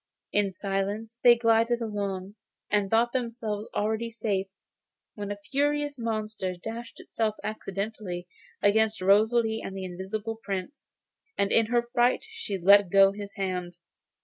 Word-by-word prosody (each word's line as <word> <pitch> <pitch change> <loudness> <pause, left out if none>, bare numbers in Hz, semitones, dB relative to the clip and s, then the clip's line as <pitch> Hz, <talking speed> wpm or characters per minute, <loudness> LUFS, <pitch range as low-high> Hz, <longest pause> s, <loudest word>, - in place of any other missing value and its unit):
In 205 -1 +2
silence 200 +4 -3
they 240 -1 +9
glided 230 0 +3
along, 200 -3 -3 0.4
and 205 -1 +2
thought 230 +2 +3
themselves 230 -4 -3
already 220 +2 0
safe, 205 -4 -2 0.7
when 205 -1 -6
a 205 - -4
furious 290 0 0
monster 215 -5 -2
dashed 230 +6 -7
itself 220 -2 -2
by 210 - -1
accident 215 0 -4 0.6
against 220 +2 +3
Rosalie 220 +4 +3
and 195 - -6
the 190 - -4
Invisible 205 +5 -5
Prince, 195 +7 -5 0.5
and 200 - +1
in 225 -1 +4
her 240 0 +1
fright 245 - +3
she 445 - -4
let 200 +1 +6
go 195 +1 +6
his 200 0 -8
hand. 180 -2 -3
215 Hz, 140 wpm, -27 LUFS, 195-230 Hz, 0.7 s, they